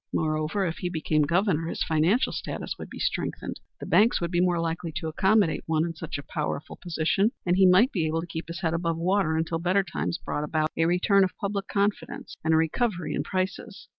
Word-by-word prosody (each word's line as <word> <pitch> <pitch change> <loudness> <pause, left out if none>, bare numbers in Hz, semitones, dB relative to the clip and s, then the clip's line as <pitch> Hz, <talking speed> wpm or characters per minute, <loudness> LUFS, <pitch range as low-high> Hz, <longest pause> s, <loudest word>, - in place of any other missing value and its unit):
Moreover, 155 +5 0
if 165 -2 -3
he 180 - -2
became 155 -2 0
Governor, 165 +1 +1
his - - -2
financial 165 +9 +2
status - - -4
would - - -7
be - - -9
strengthened. - - -3 0.2
The - - -6
banks 220 +3 +4
would 170 0 -2
be 175 -1 +2
more 180 -1 +2
likely 165 0 -2
to 160 +1 -4
accommodate 190 +2 +2
one 160 0 +2
in 170 - -4
such 160 -2 -5
a 145 - -7
powerful 150 -1 -4
position, 175 +5 0
and 175 0 +3
he 190 0 +6
might 190 +8 +5
be 165 -5 0
able 160 +1 -1
to - - -6
keep 165 -1 -6
his 170 +2 -6
head 165 -3 0
above 165 -1 -1
water 180 -1 +1
until 165 +1 -1
better 185 +3 +2
times 175 -1 -3
brought 150 - -3
about 155 +1 0
a 165 - +2
return 185 +3 +4
of 185 - -2
public 200 -1 -2
confidence 200 0 -2
and 160 - +1
a - - +5
recovery 175 +3 0
in - - 0
prices. 185 0 -4
170 Hz, 220 wpm, -26 LUFS, 160-190 Hz, 0.2 s, he